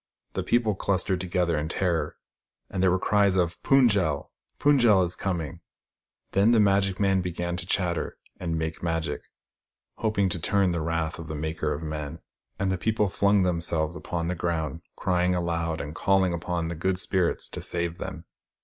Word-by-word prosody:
The - - -1
people 115 -3 +2
clustered 95 -1 0
together, 90 -2 0
in 75 +1 -3
terror, 85 -2 -1 0.5
and 95 - -1
there 95 - +5
were 90 - +3
cries 100 0 +3
of 85 -2 +2
" - - -44
Fund 135 -4 +5
j 100 - +3
el! 75 -4 -2 0.3
Fund 145 -1 +4
j 120 - +4
el 100 -4 +6
is 85 0 -2
coming! 85 -3 -3 0.4
" - - -54
Then 100 +5 +4
the 115 - +5
magic 100 -2 +3
men 95 -2 +3
began 85 0 -3
to 90 -1 -6
chatter 90 -3 0 0.2
and 85 -2 -2
make 80 0 -3
Magic, 80 -3 -2 0.7
hoping 105 -3 +1
to 85 - -3
turn 95 +3 +2
the 85 -1 -1
wrath 80 0 -2
of 85 - -7
the 80 - -4
Maker 80 +2 -2
of 75 - -3
Men; 75 -2 -4 0.4
and 95 -1 0
the 95 - -1
people 110 0 +1
flung 100 +1 +3
themselves 85 -2 0
upon 85 -2 -3
the 90 - 0
ground, 85 -2 -2
crying 90 0 +1
aloud, 85 -2 -1
and 75 +1 -5
calling 95 +1 +2
upon 85 -1 -2
the - - -3
good 90 +3 0
Spirits 95 -2 0
to - - -6
save 85 0 -2
them. 90 -3 -6
90 Hz, 195 wpm, -27 LUFS, 85-95 Hz, 0.7 s, el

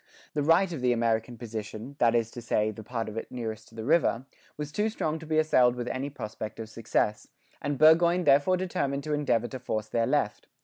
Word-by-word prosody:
The 150 - 0
right 170 +5 +3
of 150 - -5
the 125 -1 +3
American 115 0 0
position, 110 +2 -7
that 120 -1 +4
is 115 -1 +1
to 120 - -8
say, 110 -2 +1
the 110 +1 -10
part 115 +1 -4
of 110 +1 -7
it - - -5
nearest 110 -3 -5
to 115 - -18
the 110 - -5
river, 135 -3 +2 0.3
was 150 -1 -5
too 210 +6 0
strong 160 -7 -2
to 160 - -10
be 155 0 0
assailed 130 -6 +4
with 120 -1 -4
any 135 +3 -3
prospect 110 -5 -7
of 110 -1 -6
success: 110 -1 -1 0.3
and 145 -1 -2
Burgoyne 170 +4 +5
therefore 145 +5 +4
determined 140 -7 -2
to 150 - -2
endeavour 120 -5 +1
to 130 - -6
force 110 -4 -3
their 115 0 +1
left. - - 0
125 Hz, 220 wpm, -28 LUFS, 115-150 Hz, 0.3 s, Burgoyne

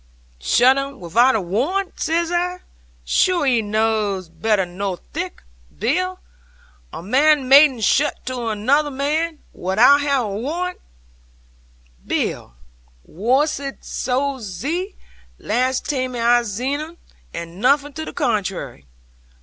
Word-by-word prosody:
'"Shutt 255 - +4
'un 275 -1 -6
wi'out 235 +10 +3
a - - +2
warrant!" 280 - -2
says 335 +1 0
I: 360 +1 -1 0.4
"sure 350 - +2
'ee 245 -4 +3
knaws 210 -4 -1
better 190 +4 0
nor 185 +1 -4 0.2
thic, - - -5 0.3
Bill! 365 - -1 0.7
A - - -8
man 275 - +3
mayn't 270 -3 +6
shutt 290 +8 +1
to 250 -2 -4
another 260 +8 +1
man, 300 +4 -2
wi'out 220 +10 +4
have 280 -4 +1
a - - -4
warrant, 345 +10 -3 1.2
Bill. - - -3 0.5
Warship 275 - -1
zed 265 +1 -2
so, 300 - -4 0.4
last 255 +4 -1
taime 255 -3 -2
I 240 +1 +3
zeed 245 +6 -3
un, 320 +3 -8 0.3
and 170 +2 -8
nothing 280 +3 +2
to 315 - -5
the - - -7
contrairy." 190 - -2
255 Hz, 120 wpm, -20 LUFS, 210-295 Hz, 1.2 s, mayn't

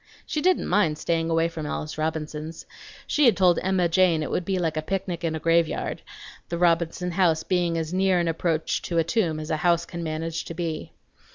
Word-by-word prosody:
She 305 - -2
didn't 370 +3 +2
mind 175 -6 +2
staying 165 +1 -1
away 165 0 +2
from 160 -2 -6
Alice 150 +1 -4
Robinson's. 155 0 -4 0.4
She 300 - +2
had 235 - +5
told 180 -3 +4
Emma 185 -2 +2
Jane 170 -2 +3
it - - -4
would 175 - -1
be 190 0 0
like 165 -3 -1
a 155 - -1
picnic 185 0 -3
in 160 -1 -1
a - - -3
graveyard, 165 0 +1 0.5
the 170 - -2
Robinson 170 +1 +1
house 170 -3 +2
being 175 -2 0
as 160 +1 -3
near 190 0 +3
an 170 - 0
approach 165 -1 0
to 170 - -3
a 165 - +4
tomb 170 -3 0
as 155 - -5
a 155 - +1
house 170 +1 +2
can 170 - -7
manage 160 0 -3
to 165 - -7
be. 160 -2 -4
170 Hz, 210 wpm, -25 LUFS, 160-180 Hz, 0.5 s, had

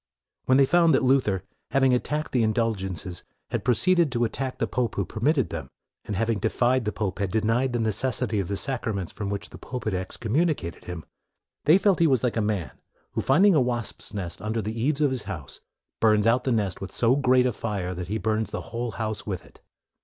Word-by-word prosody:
When 130 - +4
they 135 - +6
found 165 +1 +4
that - - +2
Luther, 125 -8 +2 0.3
having 135 -2 +3
attacked 150 +5 -1
the 125 - +2
indulgences, 95 -6 -1 0.3
had - - -1
pro 125 - +3
ceeded 175 0 +4
to 120 -2 0
attack 130 +3 -2
the - - 0
pope 120 -4 -1
who 100 - 0
permitted 125 - 0
them, 80 -5 -5 0.4
and 105 - -3
having 115 +1 0
defied 120 +4 +1
the 105 - 0
pope, 105 -3 -3
had 100 -2 0
denied 115 +6 +1
the 120 - -1
necessity 110 0 0
of 95 - -2
the 100 - -2
sacraments 110 -9 -2
from 100 -2 -4
which 100 -1 -4
the - - -11
pope 125 -2 -6
had 110 - 0
excommunicated 110 - -1
him, 90 -3 -6 0.6
they 155 +5 +7
felt 195 -2 +2
that - - +4
he - - +5
was 130 -5 +2
like 125 - 0
a 115 - +1
man, 105 -5 -1 0.4
who, - - -1
finding 185 +9 +5
a 150 - +4
wasps' 120 -3 -3
nest 90 -4 -5
under 110 +2 -2
the 110 +1 -3
eaves 145 +4 +1
of 145 -3 +3
his 130 -4 -3
house, 80 -9 -6 0.4
burns 110 -1 +4
out 115 +3 +3
the 130 - +1
nest 105 -5 0
with 95 - -6
so 120 +2 +3
great 130 -2 +4
32 - - -2
MORE - - +3
a - - -4
fire 100 -5 -3
that 90 -1 -5
he 105 +4 -1
burns 110 +1 -1
the - - -4
whole 120 0 -3
house 110 -2 -4
with 95 -4 -4
it. - - -20
115 Hz, 230 wpm, -26 LUFS, 100-130 Hz, 0.6 s, they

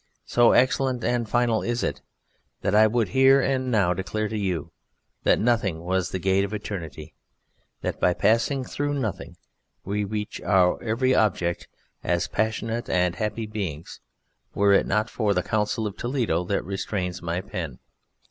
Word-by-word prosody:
So 120 -1 +4
excellent 130 -1 +2
and 120 -2 0
final 120 -2 +2
is 120 0 -2
it - - -2 0.6
that - - 0
I 110 +1 +6
would 110 -2 0
here 135 +5 +5
and 130 -1 0
now 100 -7 +2
declare 95 +4 -2
to 110 - -4
you 95 -7 -2 0.5
that - - +5
Nothing 105 -8 +1
was 95 +1 0
the - - -3
gate 95 +1 +2
of 100 +2 -3
eternity, 80 -7 -7 0.7
that - - -3
by 90 - +2
passing 115 +6 +2
through 145 +3 -2
Nothing 95 -9 -4 0.5
we 105 +2 -1
reached 105 +1 -4
our 90 -1 +3
every 125 +3 +1
object 90 -7 +1 0.4
as 85 0 0
passionate 110 +1 -2
and 90 -1 +1
happy 110 +2 -2
beings 95 -8 -5 0.6
were 100 0 +4
it 100 - +3
not 105 +3 +1
for 105 -4 0
the 90 - +1
Council 110 +1 -1
of 105 - -4
Toledo 120 -9 -1
that 100 +2 -1
restrains 95 -2 -3
my 85 +1 -2
pen. 80 -8 -6
105 Hz, 160 wpm, -25 LUFS, 90-115 Hz, 0.7 s, I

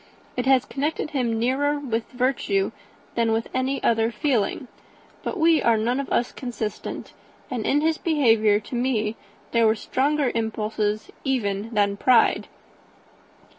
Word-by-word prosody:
It 250 +1 -2
has 265 0 +4
connected 300 +3 -2
him 245 -6 0
nearer 270 +5 +1
with 235 -5 -3
virtue 245 -6 0 0.4
than 225 -1 +1
any 260 +1 -1
other 225 -1 +3
feeling. 250 -1 0 0.5
But - - -4
we 325 -2 +4
are 230 -1 +3
none 240 +4 0
of 275 - -4
us 240 - +1
consistent; 230 -4 -5 0.4
and 240 -4 -2
in 290 - +3
his 320 0 +1
behaviour 225 -10 +3
to 220 - -12
me 230 -3 0 0.4
there 230 -1 +4
were 220 - +3
stronger 280 +4 0
impulses 215 -1 -2
even 220 -6 -1
than 200 -1 +2
pride." 250 +2 +3
240 Hz, 135 wpm, -24 LUFS, 220-270 Hz, 0.5 s, has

